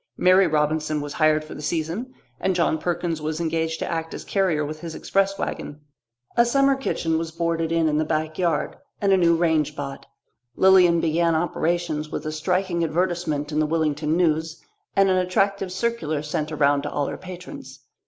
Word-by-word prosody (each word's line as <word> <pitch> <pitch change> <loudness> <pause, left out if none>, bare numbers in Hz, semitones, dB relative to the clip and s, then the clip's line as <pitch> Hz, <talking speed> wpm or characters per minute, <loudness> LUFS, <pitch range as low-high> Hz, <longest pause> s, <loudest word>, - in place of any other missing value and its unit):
Mary 185 +1 +5
Robinson 155 0 0
was 145 0 -5
hired 155 -1 +3
for 155 - -10
the - - -8
season, 170 - -3 0.3
and 190 - 0
John 165 -2 +1
Perkins 170 -1 -2
was 155 +1 -3
engaged 160 -1 -1
to - - -3
act 165 -1 -3
as - - -7
carrier 180 -7 +1
with 155 +1 -6
his 165 -1 -7
express 195 0 0
wagon. 145 - -5 0.6
A 235 - +6
summer 275 +3 +3
kitchen 165 -11 -1
was 165 0 -3
boarded 165 0 -1
in 165 -1 +2
in 150 0 +1
the - - +2
backyard, 155 +2 -1 0.2
and 200 -2 +3
a - - +5
new 170 -2 +4
range 160 -3 +1
bought; 140 -2 -6 0.5
Lilian 180 -3 +5
began 165 +1 +2
operations 160 -1 -1
with 150 - -5
a 155 - -2
striking 175 +2 0
advertisement 165 -3 -1
in 155 - 0
the 155 - +2
Willington 155 -1 0
News 160 -2 0 0.4
and 195 0 +5
an 185 - +3
attractive 190 +1 0
circular 185 -7 -2
sent 150 0 -3
around 145 -2 +2
to - - -4
all 145 - -1
her - - -4
patrons. 185 +10 -10
165 Hz, 185 wpm, -23 LUFS, 155-180 Hz, 0.6 s, A